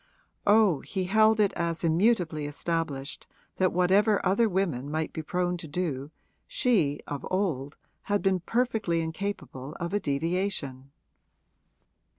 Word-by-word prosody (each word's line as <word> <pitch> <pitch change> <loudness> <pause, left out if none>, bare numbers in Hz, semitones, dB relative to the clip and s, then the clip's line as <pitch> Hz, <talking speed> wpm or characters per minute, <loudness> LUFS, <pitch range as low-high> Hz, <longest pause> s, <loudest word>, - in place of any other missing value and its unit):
Oh, 205 -7 +5
he 190 -2 -3
held 215 +3 +4
it 205 -2 +3
as 170 0 -2
immutably 165 -3 +2
established 145 -2 -3 0.3
that 185 -1 +2
whatever 195 +4 +3
other 205 +5 +3
women 170 -9 -1
might 155 +1 -2
be 160 - -4
prone 180 +2 -1
to 170 -2 -8
do 145 -4 -3 0.4
she, 225 - +1
of 145 -1 -5
old, 155 -8 -1 0.3
had 205 0 +1
been 190 -1 +2
perfectly 220 -5 0
incapable 160 -5 -5
of 175 +1 -3
a 205 - +2
deviation. 145 -4 -2
175 Hz, 130 wpm, -28 LUFS, 150-200 Hz, 0.4 s, Oh